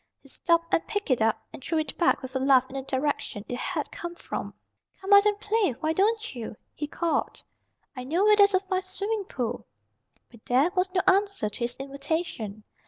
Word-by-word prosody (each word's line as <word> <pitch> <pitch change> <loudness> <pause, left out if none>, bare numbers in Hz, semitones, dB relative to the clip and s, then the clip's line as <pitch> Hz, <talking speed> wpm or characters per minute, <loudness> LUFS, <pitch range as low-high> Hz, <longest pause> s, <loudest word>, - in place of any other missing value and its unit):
He 275 - -16
stopped 335 +3 +1
and 330 - +2
picked 410 -8 -2
it 250 - +2
up 220 0 +1
and 265 - -10
threw 330 - -1
it 310 -2 -2
back 345 -5 +2
with 260 0 -8
a - - +2
laugh 260 -1 +4
in - - -9
the 270 - -2
direction 265 -6 -2
it 245 - -4
had - - -3
come 345 0 -6
from. - - -5 0.5
"Come 390 +1 +1
out 405 +1 +8
and 415 -1 +1
play, 415 - +1
why 310 +6 -1
don't 435 +3 +1
you?" 230 -3 -6 0.2
he 295 - -4
called. 335 +2 -2 0.5
"I 255 - -5
know 325 +9 +1
where 425 0 +6
there's 405 -1 +5
a - - +4
fine 375 -1 -1
swimming 400 +2 -3
pool." 245 -7 -4 0.6
But 235 -2 -17
there 265 +8 +3
was 365 0 +1
no 365 - +4
answer 390 - +2
to - - -10
his 240 0 -2
invitation. 275 - -4
320 Hz, 210 wpm, -27 LUFS, 260-390 Hz, 0.6 s, out